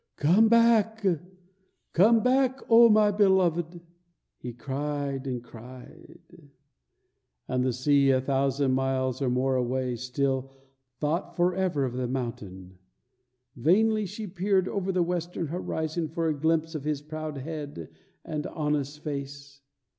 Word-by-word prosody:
"Comeback, 225 +5 +4 0.9
comeback, 250 +7 +3
O 230 +1 +8
my 210 -1 +5
beloved!" 180 -4 +1 0.6
he 125 - -6
cried 140 +2 -4
and 125 -2 -4
cried. 130 +7 -14 1.0
And 125 0 0
the 130 - +1
sea, 140 +3 +2
a 130 -1 +4
thousand 135 0 0
miles 130 0 -1
or 135 - +1
more 130 +1 +1
away, 125 0 -1
still 130 +2 -2 0.4
thought 170 +3 -2
forever 175 -4 +1
of 125 - -4
the 125 0 -2
mountain. 100 -8 -6 0.8
Vainly 210 - +2
she 210 +3 -7
peered 190 0 0
over 195 -1 -2
the 180 -1 +1
western 175 0 -3
horizon 160 0 -3
for 165 +1 -2
a 155 - +1
glimpse 160 +2 0
of 155 -3 -5
his 150 -1 -2
proud 155 -1 -6
head 145 - -6 0.4
and 155 -3 -4
honest 150 -1 -3
face. 140 -1 -7
150 Hz, 125 wpm, -27 LUFS, 130-180 Hz, 1.0 s, O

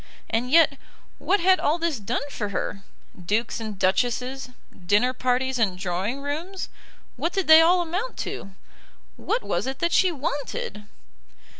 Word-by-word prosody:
And 235 +3 0
yet 290 -2 +5 0.4
what 405 - +1
had 370 +1 +5
all 305 +3 +1
this 335 -6 -1
done 240 +7 -3
for 210 -5 -3
her? 195 0 -3 0.4
Dukes 220 +7 -1
and 215 -3 -6
duchesses, 250 +7 0 0.4
dinner 230 +7 +3
parties 255 0 0
and 195 -5 +1
drawing 190 +8 -2
rooms, 335 +7 -4 0.5
what 340 - -1
did 385 -2 0
they 315 0 +10
all 350 +2 +5
amount 365 +9 -4
to? 195 -1 -7 0.6
What 475 - -2
was - - -2
it 265 0 -3
that 340 - 0
she 370 0 +4
wanted? 290 - -4
265 Hz, 150 wpm, -25 LUFS, 220-335 Hz, 0.6 s, they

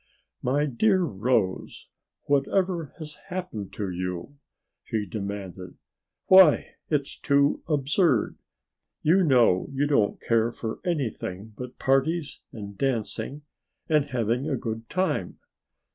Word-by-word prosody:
"My 140 +4 +1
dear 185 - +2
Rose, 105 - -1 0.4
whatever 165 +3 +1
has 155 -3 -9
happened 180 - -5
to 100 -3 -3
you?" 90 +9 -5 0.4
she 110 -2 -2
demanded. 100 -3 -6 0.5
"Why 185 -5 +7 0.2
it's 145 -3 -1
too 140 +1 +2
absurd! 145 - +2 0.6
You 180 +5 +4
know 125 - +4
you 135 +1 0
don't 140 -8 +2
care 115 0 +1
for 110 -1 -5
anything 110 - -3
but 125 +2 -8
parties 140 +3 +1
and 100 -2 -8
dancing 130 +3 -2 0.4
and 150 -2 +2
having 125 +3 0
a 135 - 0
good 115 -1 -5
time. 185 +1 -1
135 Hz, 115 wpm, -26 LUFS, 110-150 Hz, 0.6 s, Why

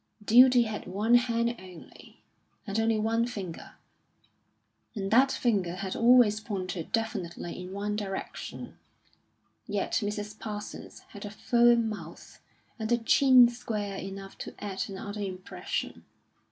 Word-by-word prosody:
Duty 250 +2 +7
had 215 -4 -5
one 205 +5 0
hand 235 -1 +3
only, 180 -3 -14 0.4
and 200 0 -2
only 225 0 +2
one 225 +2 +1
finger; 195 -8 -7 1.2
and 195 -2 -3
that 265 +4 +5
finger 195 -8 0
had 190 0 -4
always 235 -3 +5
pointed 185 -6 -5
definitely 185 -8 -3
in 180 +1 -8
one 205 +1 -3
direction. 195 -2 -6 0.9
Yet 205 -1 -1
Mrs. 210 +1 -4
Parsons 210 -1 -7
had 205 - -10
a 205 - -5
firm 235 +1 +3
mouth, 175 -7 -9 0.4
and 220 +1 -3
a 240 - +5
chin 250 +1 +6
square 210 -4 -4
enough 195 +1 -8
to - - -7
add 195 -2 -4
another 205 +2 -6
impression. 185 -2 -5
210 Hz, 125 wpm, -28 LUFS, 195-235 Hz, 1.2 s, Duty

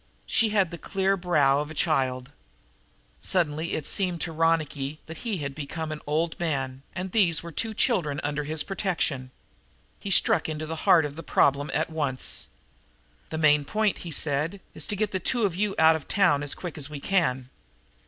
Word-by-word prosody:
She 225 - +2
had 200 -5 +2
the 170 - -7
clear 195 0 0
brow 150 -7 +3
of 150 0 -3
a 160 - -9
child. 130 -4 0 0.9
Suddenly, 165 -2 0
it 155 - -2
seemed 180 -3 0
to 165 - -1
Ronicky 155 -3 0
that 160 0 -8
he 220 -1 -2
had 140 -3 -4
become 155 +2 -5
an 155 - -5
old 160 +2 0
man, 135 -6 -2
and 185 0 -4
these 175 -8 +3
were 170 - -7
two 220 +6 -3
children 170 - +1
under 145 0 -1
his 155 +1 -2
protection. 160 -10 -1 0.7
He 200 - -6
struck 180 - +4
into 155 0 -3
the 160 0 -4
heart 165 -4 +7
of 145 +1 -6
the - - -5
problem 140 -2 +2
at 155 +1 0
once. 145 -5 -1 0.8
"The 160 - -4
main 150 -2 +4
point," 215 +6 0
he 175 - -7
said, 155 +4 -1
"is - - -4
to 210 - -1
get 210 0 -1
you 190 - 0
two 205 -1 0
out 160 0 +6
of 160 - -6
town, 180 -8 +3
as 145 -1 -1
quick 175 -4 -7
as 140 0 -4
we 150 -2 -6
can. 130 -8 0
160 Hz, 185 wpm, -26 LUFS, 145-185 Hz, 0.9 s, heart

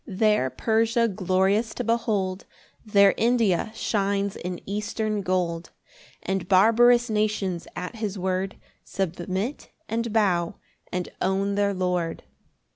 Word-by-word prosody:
3 195 - -8
There 210 - +3
Persia 230 - +1
glorious 195 +3 +1
to - - -3
behold, 205 -5 -1 0.4
There 200 -2 +5
India 225 -4 +2
shines 200 -2 0
in 180 0 -5
eastern 210 +1 -2
gold: 175 -3 -1 0.5
And 190 -2 -2
barbarous 235 +5 +5
nations 210 -5 -1
at 180 +6 -6
his 210 -2 -3
word 185 +1 -2 0.3
Submit, 190 - -3 0.2
and 230 +1 -2
bow, 185 -6 +1 0.4
and 180 -1 -2
own 195 +1 +1
their 200 0 +1
Lord. 180 -3 -1
200 Hz, 120 wpm, -25 LUFS, 185-220 Hz, 0.5 s, There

